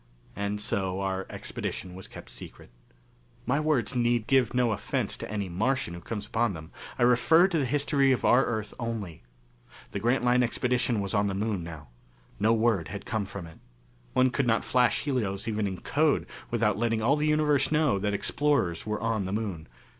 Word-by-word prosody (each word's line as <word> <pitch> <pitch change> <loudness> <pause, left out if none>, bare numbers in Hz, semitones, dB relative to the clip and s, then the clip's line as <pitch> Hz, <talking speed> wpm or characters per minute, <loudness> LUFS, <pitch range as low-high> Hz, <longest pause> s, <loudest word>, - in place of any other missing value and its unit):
And 100 +1 -2
so 95 -3 -1
our 95 -1 -2
expedition 90 - -5
was 95 +1 -8
kept - - -10
secret. - - -10 0.7
My 140 +4 +1
words 150 -6 +1
need 120 -2 +2
give 130 -3 +3
no 125 -2 +2
offence 105 - -1
to - - -7
any 100 -2 -2
Martian 110 +2 -1
who 85 - -7
comes 105 0 -5
upon 115 -1 0
them. 80 +1 -10 0.3
I 125 - +2
refer 125 +9 +5
to 170 -4 0
the 140 - +1
history 140 0 +2
of 130 - +1
our 125 +2 +5
Earth 110 -3 -3
only. 110 - -4 0.7
The 100 - -3
Grantline 125 +2 +3
Expedition 125 -2 +1
was 100 -1 -3
on 100 -1 +2
the 100 - -2
Moon 100 -3 -1
now. 80 -4 -9 0.5
No 110 +2 +3
word 110 -6 +2
had 100 +3 -7
come 105 -3 -2
from 100 -3 -7
it. 80 -1 -13 0.5
One 130 0 +4
could 125 +1 0
not 115 -1 +2
flash 125 -2 +2
helios 110 -8 -2
even 105 -2 0
in 95 -2 -5
code 150 0 +2 0.2
without - - +1
letting 115 -1 0
all 135 +5 +4
the 150 +1 0
universe 150 -2 +2
know 150 -10 +2
that 105 +1 0
explorers 110 - 0
were 105 0 -1
on 110 -3 -1
the 95 - -3
Moon. 100 -7 -3
115 Hz, 190 wpm, -28 LUFS, 100-130 Hz, 0.7 s, refer